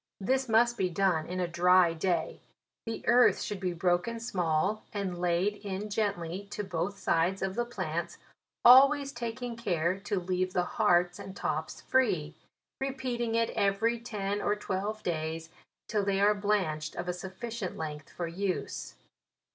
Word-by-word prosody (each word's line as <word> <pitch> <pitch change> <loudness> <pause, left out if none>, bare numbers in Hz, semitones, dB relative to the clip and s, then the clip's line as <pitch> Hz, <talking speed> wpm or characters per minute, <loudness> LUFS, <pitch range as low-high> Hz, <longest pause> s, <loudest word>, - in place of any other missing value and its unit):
This 260 +5 0
must 235 +2 +4
be 185 - +2
done 175 -3 +1
in 180 +1 -4
a 180 - 0
dry 175 0 +4
day; 175 +2 -1 0.5
the 225 - -5
earth 245 +1 +5
should 205 - -4
be 185 -2 -1
broken 175 +6 0
small, 190 -2 0
and 190 -4 -3
laid 180 +4 +1
in 205 +1 -5
gently 200 -3 -2
to 210 - -4
both 185 +1 -3
sides 175 +3 +1
of 190 -1 -1
the 240 +3 -1
plants, 240 - -4 0.5
always 275 +3 +7
ta 235 -2 -4
king 240 +1 -5
care 180 -5 0
to 205 0 -2
leave 185 +1 -1
the 180 - +2
hearts 180 -5 +2
and 195 -1 -8
tops - - -3
free; 180 -13 +1 0.5
repeating 255 -4 -2
it 230 0 +1
every 210 +4 +1
ten 205 -3 -3
or 205 - +1
twelve 210 +1 -3
days, 160 -1 -3 0.4
till 210 -3 0
they 195 -1 +1
are 205 +1 +5
blanched 195 -7 -1
of 175 - -4
a 180 - 0
sufficient 190 +3 -6
length 150 -2 -6
for 175 - -4
use. 185 +3 -3
195 Hz, 160 wpm, -30 LUFS, 175-225 Hz, 0.5 s, always